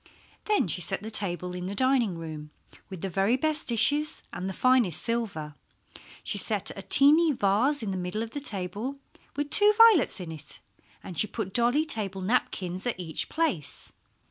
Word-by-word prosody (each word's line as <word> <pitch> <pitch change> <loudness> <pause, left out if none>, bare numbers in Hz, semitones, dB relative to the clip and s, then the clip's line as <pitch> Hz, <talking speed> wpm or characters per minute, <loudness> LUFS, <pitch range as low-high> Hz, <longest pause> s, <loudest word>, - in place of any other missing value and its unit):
Then 420 - +1
she 175 +2 -1
set 185 - +2
the 220 - -6
table 180 -3 -2
in 180 0 -5
the 200 - -5
dining 250 -7 +1
room 155 -2 -8 0.4
with 190 -4 -8
the 195 - -2
very 195 +7 +1
best 310 +2 0
dishes 290 +6 +2
and 185 - -4
the - - -3
finest 235 - +2
silver. 205 -11 -3 0.7
She - - 0
set - - -2
a - - -7
teeny 305 +4 +4
vase 240 +6 +1
in 200 - -3
the 190 - -3
middle 180 +5 -3
of 225 - -8
the 290 - -5
table, 205 +3 -3 0.4
with 290 0 -3
two 415 0 +7
violets 450 - +6
in 175 -3 -7
it, 155 -3 -8 0.4
and 175 - -6
she 215 - +3
put 200 -3 -5
dolly 245 +6 +3
table 195 - -4
napkins 185 -2 -2
at 235 - -3
each 160 -3 -2
place. 190 - -3
210 Hz, 180 wpm, -27 LUFS, 180-270 Hz, 0.7 s, two